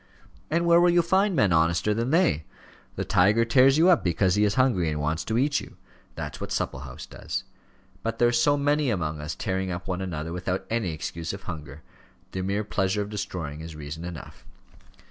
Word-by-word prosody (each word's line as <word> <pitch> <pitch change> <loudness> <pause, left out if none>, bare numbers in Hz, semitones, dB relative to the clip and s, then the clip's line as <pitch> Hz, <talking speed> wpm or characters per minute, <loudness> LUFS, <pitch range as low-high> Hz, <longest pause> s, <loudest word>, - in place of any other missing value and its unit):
"And 170 +2 +1
where 170 0 +6
will 175 - +5
you 175 0 +4
find 190 +3 +2
men 100 - +3
honester 85 +5 +2
than 115 +3 -1
they? 160 - +2 0.5
The - - -3
tiger 105 +6 +3
tears 130 +3 +5
you 170 +3 +5
up 175 - +4
because 90 +1 +2
he 105 +2 +3
is 105 0 +2
hungry 120 -11 +2
and 75 -1 -2
wants 75 +3 -1
to 110 - -1
eat 140 +2 +2
you. - - -12 0.4
That's - - -6
what - - -5
Supplehouse 65 0 -4
does. - - -5 0.6
But 115 0 -3
there 120 - +4
are - - +2
so 135 +5 +3
many 145 0 +1
among 80 -8 -2
us 75 - -4
tearing 95 0 -2
up 90 +1 -5
one 90 0 -2
another 80 -3 -4
without 90 +1 -3
any 110 -7 0
excuse 80 +2 -5
of 100 - -8
hunger. 75 -4 -8 0.5
The 95 - -3
mere 100 +3 -1
pleasure 105 0 0
of 100 - -9
destroying 80 -7 -5
is 80 -1 -8
reason 75 +2 -7
enough." 85 -3 -9
95 Hz, 205 wpm, -26 LUFS, 80-125 Hz, 0.6 s, where